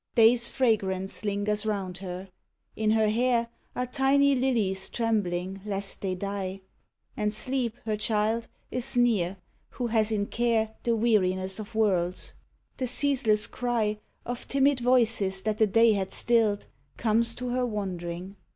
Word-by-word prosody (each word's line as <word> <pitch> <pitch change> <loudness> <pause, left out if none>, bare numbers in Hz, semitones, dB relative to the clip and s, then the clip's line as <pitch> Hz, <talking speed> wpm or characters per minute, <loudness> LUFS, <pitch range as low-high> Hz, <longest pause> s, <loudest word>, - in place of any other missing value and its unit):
Day's 235 +1 +5
fragrance 195 -7 0
lingers 205 +1 0
round 195 -4 -3
her. 185 0 -7 0.5
In 215 -1 0
her 220 0 +3
hair 235 +1 +1 0.3
Are 250 - -1
tiny 275 +2 +3
lilies 220 -8 +1
trembling 195 -5 -1
lest 200 -1 -2
they 190 -2 -2
die; 195 0 -4 0.5
And 210 -1 0
Sleep, 240 +1 -2
her 215 -1 0
child, 215 +2 0 0.2
is 250 +1 +1
near, 200 -7 +2 0.3
who 245 - -4
has 225 -2 +2
in 205 -2 0
care 225 -1 0
The 235 -1 +1
weariness 190 -4 +1
of 215 +1 -8
worlds. 185 -5 0 0.4
The 255 - -2
ceaseless 245 -5 +2
cry 225 -4 -1 0.3
Of 245 0 -5
timid 275 0 +3
voices 230 -6 +2
that 215 -1 -1
the 220 - +5
day 225 +2 +5
had 190 -2 -2
stilled 225 -4 +1 0.3
Comes 230 +1 +2
to 250 0 -4
her 250 +1 0
wandering. 185 -3 -5
215 Hz, 140 wpm, -27 LUFS, 195-240 Hz, 0.5 s, Day's